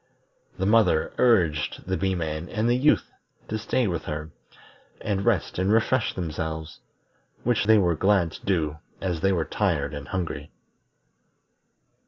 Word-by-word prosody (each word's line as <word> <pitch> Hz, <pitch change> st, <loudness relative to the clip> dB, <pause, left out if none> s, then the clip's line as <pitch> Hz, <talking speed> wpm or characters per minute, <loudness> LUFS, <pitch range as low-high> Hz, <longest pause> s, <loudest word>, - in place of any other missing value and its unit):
The 95 Hz, -, -1 dB
mother 105 Hz, -7 st, +3 dB
urged 90 Hz, -11 st, +2 dB
the 95 Hz, -, -1 dB
Bee 95 Hz, 0 st, 0 dB
man 80 Hz, 0 st, -3 dB
and 110 Hz, +2 st, 0 dB
the 120 Hz, -, +3 dB
Youth 140 Hz, +5 st, +2 dB, 0.4 s
to 110 Hz, -, -2 dB
stay 120 Hz, +3 st, 0 dB
with 85 Hz, -5 st, -2 dB
her, 75 Hz, +1 st, -5 dB, 0.7 s
and 100 Hz, -2 st, -2 dB
rest 105 Hz, -6 st, 0 dB
and 95 Hz, +2 st, +2 dB
refresh 115 Hz, +2 st, +2 dB
themselves, 80 Hz, -2 st, -4 dB, 0.6 s
which 120 Hz, -3 st, +1 dB
they 110 Hz, +1 st, +6 dB
were 90 Hz, -4 st, +3 dB
glad 95 Hz, -1 st, +2 dB
to -, -, -11 dB
do 80 Hz, -6 st, 0 dB, 0.2 s
as 90 Hz, -4 st, -2 dB
they 95 Hz, +1 st, +3 dB
were 85 Hz, -4 st, 0 dB
tired 80 Hz, -6 st, -1 dB
and 70 Hz, -1 st, -7 dB
hungry. 85 Hz, -6 st, -4 dB
95 Hz, 150 wpm, -25 LUFS, 80-105 Hz, 0.7 s, they